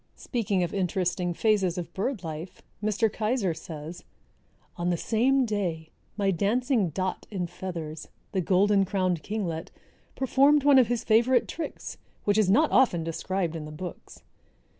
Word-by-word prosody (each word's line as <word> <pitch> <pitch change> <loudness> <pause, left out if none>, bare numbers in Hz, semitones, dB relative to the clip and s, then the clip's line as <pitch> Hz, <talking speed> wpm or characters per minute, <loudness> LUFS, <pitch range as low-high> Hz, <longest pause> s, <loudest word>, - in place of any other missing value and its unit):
Speaking 205 -7 -1
of 170 - -3
interesting 180 -1 0
phases 195 -5 +2
of 175 - -5
bird 205 0 -2
life, 160 +2 -7 0.2
Mr. 215 +2 +2
Keyser 215 -3 -1
says, 160 +1 -8 0.7
"On 175 0 -1
the 175 - +1
same 255 +7 +2
day 175 -8 -3 0.3
my 200 -2 +2
dancing 220 - +1
dot 185 +4 -3
in 190 -4 -2
feathers, 170 -3 -6 0.2
the 190 - 0
Golden 195 +3 +3
crowned 185 -4 0
Kinglet, 185 -4 -3 0.5
performed 275 +2 +4
one 280 -2 +7
of 250 - +4
his 240 -1 -1
favorite 235 +3 +3
tricks, 330 - -6 0.2
which 205 +1 +2
is 205 -4 +3
not 295 +11 +4
often 175 -10 +4
described 170 +1 -2
in 155 -2 -5
the 150 - -8
books. 175 +3 -9
195 Hz, 150 wpm, -27 LUFS, 175-225 Hz, 0.7 s, one